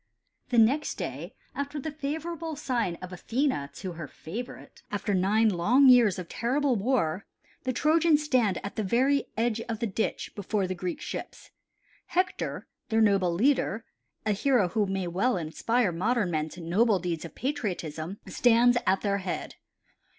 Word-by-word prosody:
The 245 - 0
next 250 +7 +3
day 170 - -6 0.2
after 285 +2 -4
the 315 +3 -4
favorable 315 +2 -4
sign 240 - -1
of 185 0 -7
Athene 225 - -1
to 180 +6 -6
her 165 -3 -7
favorite, 215 - -8
after 205 0 -2
nine 205 +4 +3
long 235 +9 +5
years 235 -7 +6
of 180 -2 -6
terrible 260 - 0
war 205 -5 0 0.4
the 260 - +1
Trojans 305 +3 +3
stand 245 -10 +2
at 200 - -6
the 215 - 0
very 260 +8 +2
edge 225 0 0
of 225 - -2
the 230 - -2
ditch 220 +1 -2
before 205 0 -1
the 185 - -2
Greek 180 0 -4
ships. - - -7 0.6
Hector 365 +1 -1 0.2
their 225 -1 +2
noble 195 -5 +3
leader, 225 +2 +1 0.4
a 215 - +2
hero 210 -2 +2
who 210 +3 0
may 190 -1 -2
well 190 +7 +1
inspire 185 +7 0
modern 205 +3 0
men 155 -1 -1
to 175 - -10
noble 200 +6 +3
deeds 170 -3 -3
of 165 - -9
patriotism, 190 - -3
stands 245 0 +4
at 190 +1 +3
their 200 -1 0
head. 185 -2 -4
220 Hz, 160 wpm, -28 LUFS, 180-255 Hz, 0.6 s, years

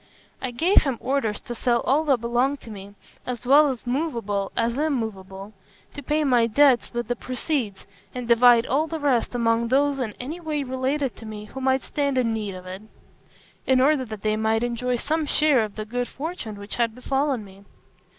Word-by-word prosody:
I 260 - -2
gave 330 +11 +4
him 270 -5 -2
orders 260 -6 -1
to 240 - -6
sell 240 0 +1
all 290 +4 +2
that 270 -6 +2
belonged 245 +4 0
to 225 - -11
me, 200 0 -10 0.3
as 250 -1 -5
well 280 0 +5
movable 235 -8 -2
as 230 +1 +1
immovable 215 -9 -3 0.4
to 290 - -7
pay 300 +3 0
my 245 -5 +3
debts 265 +2 +4
with 240 -2 -3
the 245 - -1
proceeds, 250 -5 -3 0.3
and 250 -2 -4
divide 235 0 +6
all 295 +5 +1
the 320 0 -4
rest 260 -4 +1
among 230 -1 +1
those 275 +2 +2
in 220 -5 -3
any 300 +8 -5
way 305 -4 -2
related 260 +1 -2
to 225 - -10
me 210 -1 -7
who 265 +5 -8
might 265 0 +1
stand 280 -3 -1
in 235 -3 +1
need 210 -3 -4
of 185 0 -10
it, 185 +2 -7 0.9
in 260 -1 +4
order 275 +1 +3
that 215 -4 -8
they 215 0 +1
might 220 +1 +1
enjoy 245 +1 -1
some 310 +5 -1
share 295 -7 +3
of 210 -2 -6
the 215 - -5
good 245 +2 -3
fortune 290 - -6
which 200 0 -7
had 230 -2 0
befallen 270 -2 -1
me. 195 0 -16
245 Hz, 195 wpm, -24 LUFS, 225-280 Hz, 0.9 s, divide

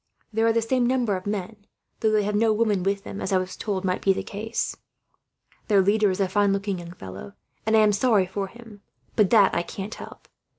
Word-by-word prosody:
There 225 +1 +2
are - - +5
the 230 0 +1
same 245 +1 +1
number 245 -5 +1
of 185 +1 -6
men, 205 +1 -5 0.3
though 220 - +2
they 215 -1 +3
have 210 +1 -1
no 220 +2 +3
women 215 -3 +1
with 195 +1 -1
them, 200 - -7
as - - -3
I 190 - +4
was 185 0 -3
told 195 -3 -3
might 185 -1 0
be 195 - +3
the - - -4
case. 220 +3 -3 0.9
Their 205 -3 +4
leader 210 +1 +3
is 185 - -2
a 195 - +2
fine 200 +1 +2
looking 195 -1 -1
young 170 0 -9
fellow, 95 - -9 0.3
and 220 0 +4
I - - +6
am 210 -1 +4
sorry 205 -2 +3
for 195 +2 -4
him, 225 -1 -14 0.3
but 210 -3 +4
that 210 -5 +5
I - - +1
can't 195 +4 -6
help. - - -11
205 Hz, 230 wpm, -25 LUFS, 190-220 Hz, 0.9 s, I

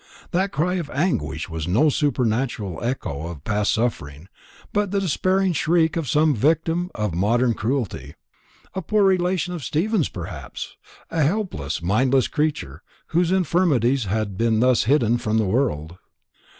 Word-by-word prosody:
That 190 +2 0
cry 180 +6 0
of 165 -5 -4
anguish 105 - -1
was 80 -1 -5
no 115 - +3
supernatural 120 - -1
echo 85 - -3
of 80 -5 -8
past 105 +2 0
suffering, 90 -8 -3 0.4
but 205 -1 +1
the 200 +1 0
despairing 190 +1 +1
shriek 160 +1 +2
of 165 -7 -2
some 150 +4 +3
victim 165 - +1
of 105 -5 -2
modern 115 +7 +2
cruelty. 110 - -3 0.6
A 190 - -3
poor 210 +4 +2
relation 180 -2 +1
of 165 -5 -6
Stephen's 175 - 0
perhaps 85 -7 -7 0.4
a 165 - 0
helpless, 145 - -1
mindless 125 +7 +2
creature, 145 - -2 0.3
whose 170 +1 +2
infirmities 145 - +2
had 100 -1 -2
been 115 -1 +2
thus 125 -2 +3
hidden 120 -3 +3
from 110 -1 0
the 110 - +2
world. 95 - -1
130 Hz, 145 wpm, -23 LUFS, 100-170 Hz, 0.6 s, no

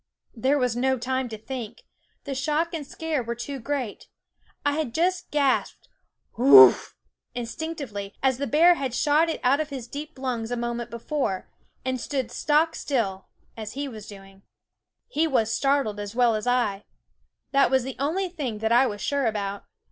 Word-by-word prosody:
There 265 +5 +2
was 250 -4 +1
no 260 +2 +1
time 260 +1 -2
to 220 - -6
think; 235 0 -7 0.4
the 280 - -4
shock 305 +5 0
and 300 -4 -4
scare 315 -1 -2
were 235 0 -4
too 265 +4 -6
great. 255 -3 -4 0.6
I 290 +2 +2
just 345 +9 -1
gasped 280 -3 0 0.5
Hoowuff! 280 +12 +8 0.4
instinctively, 240 -5 -5
as 260 -2 +2
the 280 - -1
bear 330 +6 +6
had 265 -7 -3
shot 305 +4 +3
it 325 - -2
out 265 +3 +4
of 310 -1 -2
his 260 -4 -6
deep 295 +3 -7
lungs 245 -4 -3
a 245 - -2
moment 235 0 -3
before, 235 -4 -3 0.3
and 260 -1 -1
stood 260 -5 -3
stock 310 +2 +2
still, 200 -9 -2 0.3
as 215 -1 -7
he 280 +2 -3
was 215 -5 -9
doing. 195 -1 -13 0.7
He 325 -9 +1
was 225 -6 +1
startled 275 -7 +1
as 205 +1 -6
well 240 -2 +4
as 215 +2 -3
I. 225 -5 +1 0.7
That 275 0 +4
was 265 -1 +2
the 265 0 -5
only 335 +8 0
thing 290 -11 -4
that 220 +1 -1
I 245 +3 +5
was 205 -3 -5
sure 280 -3 0
about. 200 -2 -3
260 Hz, 170 wpm, -25 LUFS, 230-290 Hz, 0.7 s, Hoowuff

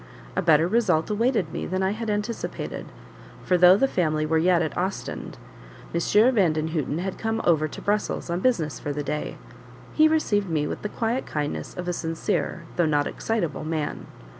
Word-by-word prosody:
A - - +1
better 160 0 +4
result 210 -5 +2
awaited 230 +3 +1
me - - -3
than 185 +1 -1
I 190 - +2
had 220 +1 -4
anticipated, 210 +2 -3 0.6
for 180 - +2
though 180 +1 +7
the 270 - +3
family 155 -9 0
were 160 +1 +2
yet 175 +1 +3
at 155 - -3
Ostend, 190 +2 -4 0.6
M. 170 - +1 0.3
Vandenhuten 155 - +1
had 185 +2 -4
come 225 0 -1
over 155 -3 +3
to - - -9
Brussels 210 +1 -1
on 175 - 0
business 180 - 0
for 145 - -4
the 145 +1 -3
day. 150 +2 -3 0.6
He 310 0 +6
received 210 - +1
me 155 -2 0
with - - -4
the 210 - -3
quiet 235 +4 -2
kindness 150 -1 -4
of 180 0 -4
a 180 - 0
sincere 165 0 -2
though 175 -2 +3
not 145 -1 +2
excitable 185 -11 -2
man. 155 -1 -3
175 Hz, 180 wpm, -25 LUFS, 155-210 Hz, 0.6 s, though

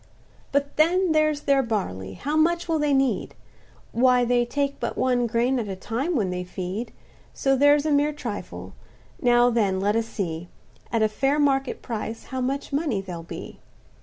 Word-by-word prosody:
"But 280 0 -1
then 350 +3 +3
there's 310 -1 +2
their 275 -2 +3
barley; 185 - -3
how 290 - -3
much 340 +2 +2
will 325 -2 +1
they 295 -1 +1
need? 270 -1 +1 0.6
Why 250 0 +4
they 240 0 +2
take 280 +2 -1
but - - -3
one 245 -2 +2
grain 240 +3 +1
at 220 - -3
a 195 - -4
time 245 - -2
when 200 -8 0
they 180 0 -3
feed, 185 +5 -5 0.4
So 270 0 +2
that's 290 +2 +4
a 310 - +1
mere 290 +1 +3
trifle; 240 -8 -6 0.5
now 245 -1 +4
then 200 -5 +1
let 205 +2 +1
us 230 0 0
see, 175 -6 -4 0.4
At 230 -2 +2
a - - +5
fair 270 +7 0
market 275 -2 +1
price, 225 -1 -5
how 260 - -1
much 275 +3 -3
money 285 -8 0
there'll 180 -3 -6
be? 165 - -9
250 Hz, 180 wpm, -25 LUFS, 215-285 Hz, 0.6 s, a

